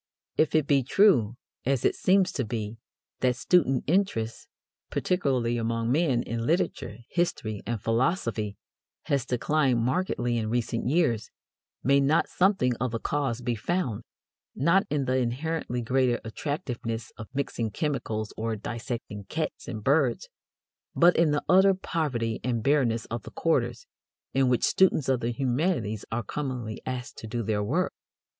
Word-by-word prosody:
If 155 0 +2
it 155 -3 +4
be 140 -2 +3
true, 130 - +4 0.3
as 135 -1 0
it - - +4
seems 190 0 +3
to 140 - -2
be, 110 -1 -4 0.4
that 125 -1 +2
student 135 -3 +2
interest, 150 - 0 0.4
particularly 130 -9 0
among 115 0 -1
men, 135 -5 +2
in 115 0 -3
literature, 155 - 0
history, 110 - -1
and 115 -1 -1
philosophy, 115 - 0 0.5
has 135 -2 0
declined 130 +1 +2
markedly 120 -3 0
in 110 -1 -2
recent 115 0 -1
years, 130 -7 +1 0.5
may 140 +2 +4
not 140 +4 +3
something 180 - +2
of 125 +1 -1
the 115 0 -3
cause 135 -4 -1
be 120 -1 -1
found, 125 - -1 0.5
not 170 +8 +3
in 145 -2 0
the 130 +1 +1
inherently 125 0 -2
greater 125 0 +2
attractiveness 115 - -4
of 110 - -8
mixing 130 -4 -2
chemicals 115 -5 -2
or 110 0 -2
dissecting 110 -2 -5
cats 155 +9 -4
and 110 -2 -5
birds, 135 -3 +2 0.7
but 175 +1 +6
in 165 -2 +4
the 150 0 0
utter 190 +1 +6
poverty 130 -11 -2
and 120 -2 -1
bareness 130 -6 +2
of 115 0 -2
the - - -10
quarters 120 -7 0 0.5
in 135 -1 +3
which 125 -2 +2
students 185 -7 +3
of 130 -2 +2
the 115 - -1
humanities 120 - -1
are 120 +1 -1
commonly 125 -7 -4
asked 130 0 -5
to 110 - -7
do 120 +1 -3
their 105 -1 0
work? 160 - 0
125 Hz, 150 wpm, -27 LUFS, 115-150 Hz, 0.7 s, but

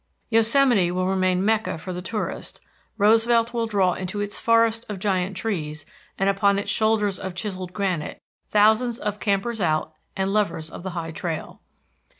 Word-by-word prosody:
Yosemite 225 -3 +4
will 185 +1 -1
remain 185 0 +1
Mecca 220 -4 +1
for 185 +3 -6
the 180 - -5
tourist; 210 +4 -4 0.4
Roosevelt 230 +3 +3
will 230 -1 0
draw 195 -4 +2
into 185 +3 -4
its 205 0 -3
forest 230 0 +3
of 205 - -4
giant 190 -1 -1
trees, 155 -9 -3 0.3
and 195 - +1
upon 195 0 +3
its 200 0 -1
shoulders 210 -3 +1
of 185 -1 -5
chiselled 185 -1 -5
granite, 185 -6 -2 0.3
thousands 220 +3 +3
of 210 -2 -3
campers 210 +2 -1
out 155 -2 0 0.2
and 195 +1 0
lovers 165 -6 -1
of - - -8
the 190 - -4
high 165 -1 -3
trail. 160 -1 -5
200 Hz, 160 wpm, -24 LUFS, 185-220 Hz, 0.4 s, Yosemite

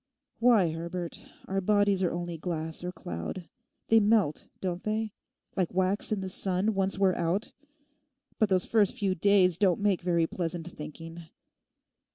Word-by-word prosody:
Why, 225 -8 +4
Herbert, 170 +1 -5 0.3
our 195 0 -1
bodies 205 0 +3
are 180 - +1
only 175 0 -4
glass 160 0 -4
or 180 - -3
cloud. 90 - -6 0.4
They 225 - +7
melt, 205 -7 +2
don't 180 -1 -3
they, 215 0 -2 0.4
like 185 -2 -1
wax 190 +3 +1
in 210 -2 0
the 190 - -4
sun 190 +3 0
once 195 0 0
we're 190 -1 +3
out. 175 +6 -1 0.9
But 215 - +3
those 185 -2 +3
first 220 +1 +2
few 200 -5 +1
days 185 -2 +3
don't 185 -4 +3
make 200 -3 +1
very 170 -2 +2
pleasant 170 0 -4
thinking. 165 +2 -9
185 Hz, 155 wpm, -29 LUFS, 170-205 Hz, 0.9 s, They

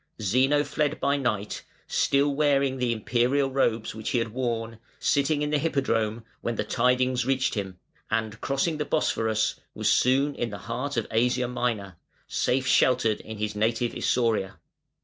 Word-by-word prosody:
Zeno 130 +8 +3
fled 150 +1 -1
by 140 - +2
night, 110 -7 -2 0.2
still 140 +1 +2
wearing 140 -2 +2
the 125 -1 +1
Imperial 125 +5 +1
robes 115 -4 0
which 110 -1 -5
he - - +1
had 115 -1 0
worn, 115 -2 -3 0.2
sitting 145 +1 +1
in 150 - -1
the 150 - +2
Hippodrome, 115 -7 0 0.2
when 120 - -2
the - - -1
tidings 125 0 +1
reached 135 +1 +1
him, 95 -4 -4 0.3
and 110 -1 -2
crossing 145 +4 0
the 150 - -1
Bosphorus 110 -7 0 0.2
was - - +1
soon 135 +3 +3
in 120 -3 -3
the 100 - -6
heart 125 +5 -3
of 115 - 0
Asia 125 +2 +2
Minor, 115 -7 -2 0.3
safe 130 +1 0
sheltered 120 -4 +3
in 110 -1 -8
his 105 0 -3
native 115 +3 0
Isauria. 115 -6 0
125 Hz, 160 wpm, -26 LUFS, 110-135 Hz, 0.3 s, Zeno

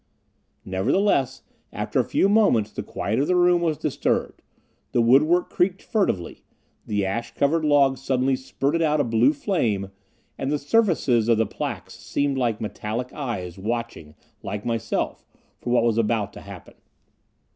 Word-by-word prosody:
Nevertheless, 130 - +1 0.3
after - - -2
a - - +3
few - - +2
moments 200 - +3
the - - -5
quiet 110 +5 -2
of 140 - +1
the 180 - +2
room 175 -1 +4
was 160 -3 0
disturbed, - - -1 0.5
the - - +2
woodwork 150 +9 +4
creaked 185 +1 0
furtively, 195 - -1 0.4
the 105 -2 0
ash 115 +5 -4
covered 155 +3 +1
log 140 -3 +3
suddenly 130 0 +1
spurted 140 +4 -2
out 155 -1 +2
a - - +3
blue 115 +2 +3
flame, 115 - -1 0.5
and 135 - -2
the 150 - +1
surfaces 145 - +2
of 115 - +4
the 115 - +2
plaques - - -5
seemed 140 -1 -1
like 115 -4 0
metallic 110 +3 -4
eyes, 100 - -5
watching, 110 -8 -4 0.3
like 105 0 -5
myself, 115 -2 -2 0.4
for - - -6
what 120 -1 +3
was 115 -1 +2
about 105 -2 0
to - - -10
happen. - - -11
130 Hz, 155 wpm, -24 LUFS, 110-150 Hz, 0.5 s, room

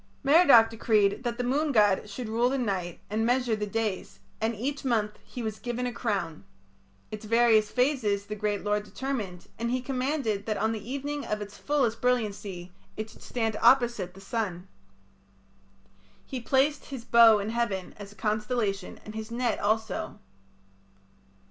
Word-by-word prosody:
Merodach 280 -6 +7
decreed 215 -1 +2
that 235 -1 -2
the 245 - -1
moon 290 +5 +1
god 210 -3 +3
should 230 +3 -6
rule 230 +3 +2
the 270 - 0
night 190 -8 -2
and 215 +2 -1
measure 245 -1 +2
the 210 -1 -3
days, 215 -2 -3 0.2
and 225 +1 0
each 275 +7 -3
month 220 -5 0
he 245 - -7
was 215 -1 -4
given 245 +1 -3
a 245 - -2
crown. 195 -9 -2 0.7
Its 215 0 -7
various 225 -1 +4
phases 250 -7 +1
the 210 - -5
great 210 -1 -2
lord 210 0 +1
determined, 210 -6 -5
and 235 +1 -1
he 255 +1 0
commanded 255 -5 -2
that 215 - 0
on 220 - +1
the 220 +2 -6
evening 285 +1 -3
of 210 - -2
its 205 0 -8
fullest 255 -6 0
brilliancy 205 -7 -1 0.3
it 215 0 -5
should - - -17
stand 225 -3 -2
opposite 235 -7 +3
the - - -12
sun. 195 -4 -3 1.6
He 260 -2 -5
placed 275 +5 +1
his 260 -5 -8
bow 230 -2 +7
in 205 +2 -3
heaven 210 -6 -2
(as 205 -1 -9
a - - -16
constellation) 210 -2 -2
and 215 - -8
his 220 0 -6
net 235 -2 -1
also. 220 +1 -1
225 Hz, 165 wpm, -28 LUFS, 205-250 Hz, 1.6 s, Merodach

